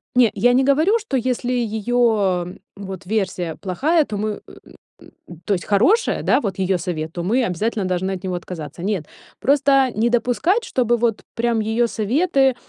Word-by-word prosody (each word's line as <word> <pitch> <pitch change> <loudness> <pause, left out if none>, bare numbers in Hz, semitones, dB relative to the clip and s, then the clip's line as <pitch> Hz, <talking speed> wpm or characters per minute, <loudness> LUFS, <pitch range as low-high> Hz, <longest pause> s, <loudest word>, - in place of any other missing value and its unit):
Не, 245 -3 +5
я 245 +1 +3
не 260 - +3
говорю, 315 - +3
что 345 -12 -2
если 250 0 -1
её 220 -6 0 0.2
вот 190 -2 -8
версия 185 -5 -2
плохая, 290 - +1
то 210 - -5
мы 210 0 -3 0.7
м, 170 -2 -16
то 205 - +1
есть 175 - -3
хорошая, 250 - +2
да, - - +3
вот 195 -5 -4
её 190 -1 +1
совет, 165 -3 -4
то 175 - -4
мы 240 +7 +1
обязательно 210 +2 -1
должны 185 +1 -1
от 190 0 -5
него 185 -1 -2
отказаться. 170 -2 -7
Нет. 190 -7 -2 0.3
Просто 275 -1 +3
не 230 +2 +2
допускать, 250 - +1
чтобы 245 - +1
вот 230 -2 0
прям 235 -1 0
её 225 +2 +1
советы 270 - +1
220 Hz, 170 wpm, -21 LUFS, 185-250 Hz, 0.7 s, Не